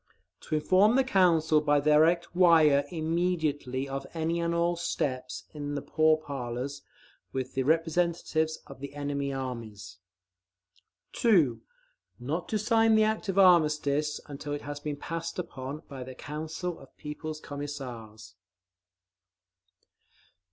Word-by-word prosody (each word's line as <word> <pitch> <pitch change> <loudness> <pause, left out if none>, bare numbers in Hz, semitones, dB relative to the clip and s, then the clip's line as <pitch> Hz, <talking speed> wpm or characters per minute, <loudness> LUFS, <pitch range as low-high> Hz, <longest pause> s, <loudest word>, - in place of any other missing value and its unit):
To - - -3
inform 190 +8 +4
the 270 - +4
Council 170 -9 +3
by 145 -1 +3
direct 160 +4 +3
wire 160 -6 +5
immediately 160 -5 -1
of 135 0 -5
any 165 +1 -1
and 170 0 0
all 170 +1 +1
steps 130 -6 -3
in 145 -1 -4
the 145 - -2
pourparlers 140 -4 0 0.5
with 130 -1 -3
the 135 - 0
representatives 160 +1 +1
of 140 -2 -12
the 140 +1 -8
enemy 140 -1 -2
armies. 115 -8 -6 1.1
2. 170 - +3 0.6
Not 150 +8 -3
to 215 - +1
sign 225 +1 +3
the 220 - +5
act 215 -1 -1
of 195 - -1
armistice 150 -5 +4
until 145 0 -6
it 145 - -5
has 145 0 -6
been 145 0 -4
passed 165 +3 -5
upon 145 -3 -6
by 135 -3 -7
the 130 0 -9
Council 160 +5 -5
of - - -17
People's 155 +1 -6
Commissars. 130 -8 -7
150 Hz, 125 wpm, -29 LUFS, 140-170 Hz, 1.1 s, wire